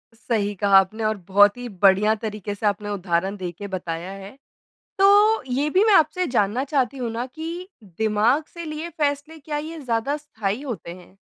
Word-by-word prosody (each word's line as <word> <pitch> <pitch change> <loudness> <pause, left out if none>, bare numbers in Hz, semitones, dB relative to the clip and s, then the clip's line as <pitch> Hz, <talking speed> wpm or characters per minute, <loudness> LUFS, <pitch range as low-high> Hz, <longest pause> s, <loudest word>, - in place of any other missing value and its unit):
सही 215 -3 -1
कहा 200 0 +4
आपने 215 +4 -2
और 215 -1 0
बहुत 205 +3 +5
ही 245 0 -6
बढ़िया 200 +2 +4
तरीक़े 210 -2 -5
से 210 - -5
आपने 205 0 0
उदाहरण 190 0 -1
देके 185 +2 -6
बताया 180 -1 -5
है। 195 0 -9 0.7
तो 410 +1 +5
ये 285 +4 0
भी 380 +6 +3
मैं 430 - +5
आपसे 360 +2 +3
जानना 235 +1 +1
चाहती 275 -2 -1
हूँ 240 -2 -3
ना 235 +2 -3
कि 330 +7 -7 0.2
दिमाग 220 - +1
से 340 -1 -7
लिए 310 +2 -5
फ़ैसले 290 +2 -1
क्या 295 +1 -4
ये 315 +2 -6
ज़्यादा 255 +2 -1
स्थायी 220 -6 -4
होते 235 -11 -6
हैं? 185 +1 -16
225 Hz, 180 wpm, -23 LUFS, 200-295 Hz, 0.7 s, बहुत